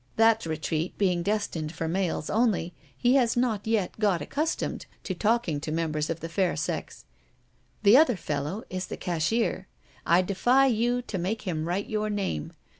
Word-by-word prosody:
That 225 -4 +4
retreat 155 +2 -2
being 180 -4 +2
destined 170 -6 -2
for 165 -1 -3
males 170 -2 -1
only, 210 -6 +1 0.2
he 245 +1 +3
has 240 -3 +2
not 225 -4 0
yet 220 -3 0
got 200 -5 +2
accustomed 300 - -2 0.2
to 190 - -3
talking 210 -5 +1
to 155 - -4
members 155 -2 -1
of 165 0 -3
the 165 - -4
fair 175 +2 0
sex. 140 - -4 0.8
The 210 +4 +8
other 275 -6 +5
fellow 150 +6 -3
is 185 0 -4
the - - -6
cashier. 180 +7 -1 0.4
I 175 +2 +4
defy 245 +8 +3
you 245 0 +1
to 200 -6 -4
make 200 +6 -2
him 165 -5 -2
write 185 +4 -1
your 215 0 -1
name. 195 - -3
190 Hz, 170 wpm, -27 LUFS, 165-225 Hz, 0.8 s, The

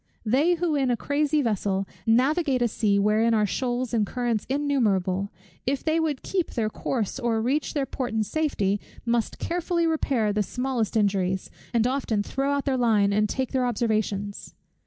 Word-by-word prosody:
They 285 +11 +3
who 340 -2 0
in 275 -3 +1
a 240 - +1
crazy 295 +3 +1
vessel 195 -3 0 0.2
navigate 265 +3 +3
a - - +3
sea 210 -2 +1
wherein 215 +3 +3
are 210 -1 +3
shoals 245 +3 -2
and 225 -2 +3
currents 235 0 -2
innumerable, 210 -10 +1 0.4
if 270 0 0
they 320 +1 +1
would 305 -4 -1
keep 370 -4 -1
their 215 -2 -1
course 235 0 -2
or 235 -3 0
reach 270 +8 -1
their 280 -2 +1
port 255 -1 -4
in 220 -1 +1
safety, 205 -7 0 0.3
must 235 -2 0
carefully 345 0 -1
repair 265 -9 +1
the 210 - +1
smallest 245 0 -1
injuries, 190 -3 0 0.2
and 235 -2 +2
often 250 -5 0
throw 270 +6 -1
out 280 -1 -1
their 270 -2 +1
line 215 -5 +3
and 210 +1 +2
take 260 +3 -2
their 255 -2 +1
observations. 215 -3 -2
240 Hz, 175 wpm, -25 LUFS, 210-280 Hz, 0.4 s, They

